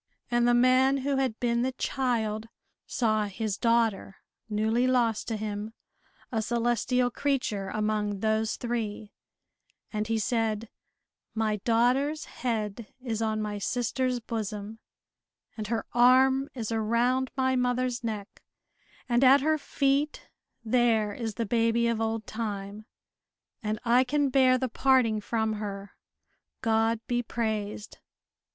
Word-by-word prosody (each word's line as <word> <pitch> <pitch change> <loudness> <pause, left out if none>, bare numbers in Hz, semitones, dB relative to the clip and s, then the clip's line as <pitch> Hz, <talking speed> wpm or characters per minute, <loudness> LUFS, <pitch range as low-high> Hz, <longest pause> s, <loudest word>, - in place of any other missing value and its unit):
And 240 0 +3
the 240 - +4
man 255 +2 +4
who 280 -1 +1
had 260 -5 -1
been 235 -1 +1
the 260 +1 -1
child 225 -5 -1 0.4
saw 215 -3 +1
his 205 0 -3
daughter, 225 -3 +1 0.3
newly 220 +4 +1
lost 235 -4 +1
to 225 - -2
him, 210 +1 -4 0.6
a 225 -3 0
celestial 240 +2 +1
creature 235 -9 -1
among 210 -1 -1
those 220 0 +1
three, 220 -3 -4 0.8
and 210 0 -2
he 225 0 0
said, 225 -2 -1 0.7
"My 220 -1 0
daughter's 250 +8 +1
head 220 -2 -4
is 230 -4 -3
on 215 -1 0
my 210 -1 -4
sister's 250 +3 -1
bosom, 215 -1 -5 0.8
and 215 -2 -5
her 230 0 -2
arm 260 +3 +5
is 230 -3 -4
around 235 +4 +1
my 260 0 +2
mother's 250 -1 0
neck, 215 -3 -5 0.7
and 240 +1 +2
at 270 +1 +7
her 310 +2 +1
feet 280 +1 0 0.4
there 225 -3 +2
is 225 -1 -4
the 230 - -1
baby 230 +1 +2
of 230 -1 0
old 225 0 -2
time, 210 -1 -5 0.7
and 215 0 -2
I 240 +2 +5
can 285 +2 +1
bear 255 -1 +4
the 260 0 -1
parting 245 -3 +2
from 220 0 -1
her, 200 -1 -6 0.7
God 225 0 +2
be 240 0 0
praised!" 215 -3 -4
230 Hz, 130 wpm, -28 LUFS, 215-250 Hz, 0.8 s, at